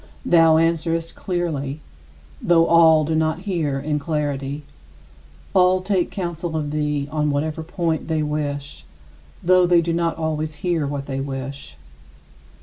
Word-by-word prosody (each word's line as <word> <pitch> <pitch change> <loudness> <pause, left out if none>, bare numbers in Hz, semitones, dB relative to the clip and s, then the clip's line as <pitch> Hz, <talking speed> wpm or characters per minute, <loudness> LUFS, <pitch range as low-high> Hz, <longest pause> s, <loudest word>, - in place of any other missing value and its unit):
Thou 165 -2 +5
answerest 165 0 0
clearly, 155 -6 -3 0.6
though 165 -1 +4
all 160 -2 +5
do 160 - -1
not 160 +1 0
hear 165 -8 -1
in 150 +1 -1
clarity. 145 -2 -3 0.9
All 185 0 +4
take 185 -2 0
counsel 170 -3 -4
of 150 -2 -3
thee 150 -2 -1
on 150 -1 0
whatever 150 +2 -1
point 165 -1 -2
they 160 -2 0
wish, 145 -1 -4 0.6
though 185 0 +5
they 175 -1 +5
do 170 0 -1
not 170 0 0
always 155 -1 -2
hear 165 -5 +1
what 140 -1 -4
they 135 -1 -4
wish. 135 - -6
160 Hz, 140 wpm, -22 LUFS, 145-170 Hz, 0.9 s, Thou